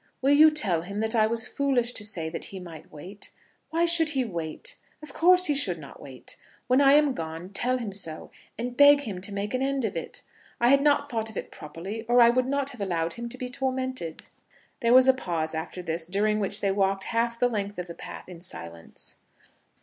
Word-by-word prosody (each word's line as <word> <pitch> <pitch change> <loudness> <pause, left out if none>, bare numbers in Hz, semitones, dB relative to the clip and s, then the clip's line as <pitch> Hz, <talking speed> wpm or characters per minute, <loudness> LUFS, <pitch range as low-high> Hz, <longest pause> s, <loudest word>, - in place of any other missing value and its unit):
Will 275 +2 +3
you 310 +2 +8
tell 205 - +2
him 200 +4 -7
that 220 +1 0
I 215 -2 +3
was 230 +1 0
foolish 260 -4 0
to 210 - -2
say 180 -6 -3
that 160 - -5
he 195 - -8
might 165 -4 -11
wait? 185 +7 -9 0.4
Why 335 +1 +1
should 335 -2 +4
he 260 - +1
wait? 175 - -5 0.3
Of 295 -3 -11
course 365 +2 +5
he 295 - +2
should 210 -12 +2
not 145 -3 -12
wait. 130 -2 -9 0.3
When 255 +2 +3
I 275 0 +6
am 295 -2 +4
gone, 165 -2 -6
tell 245 +6 +1
him 225 -5 -5
so, 165 -5 -3 0.3
and 245 +2 -4
beg 285 +1 +7
him 200 -9 -6
to 200 - -2
make 200 +2 -4
an 255 - -1
end 270 -2 0
of 200 -3 -3
it. 165 - -6 0.4
I 240 - +4
had 275 +1 +5
not 285 0 +2
thought 225 -2 -2
of 220 - -10
it - - -6
properly, 170 +8 -7
or 240 +1 +4
I 235 0 +7
would 255 +1 0
not 280 0 -1
have 245 - -11
allowed 170 -4 -1
him 235 0 -6
to 255 - -6
be 250 - -4
tormented." 260 -8 -3 0.6
There 235 -1 +3
was 260 0 +7
a 265 - +7
pause 165 -10 -3
after 160 +3 -5
this, 165 -1 -2
during 210 +3 0
which 200 - 0
they 200 - +1
walked 195 0 0
half 235 +1 -1
the 245 +1 +2
length 205 -3 -4
of 180 - -4
the 170 - -9
path - - -10
in 175 -2 -11
silence. 85 - -8
220 Hz, 225 wpm, -26 LUFS, 180-260 Hz, 0.6 s, you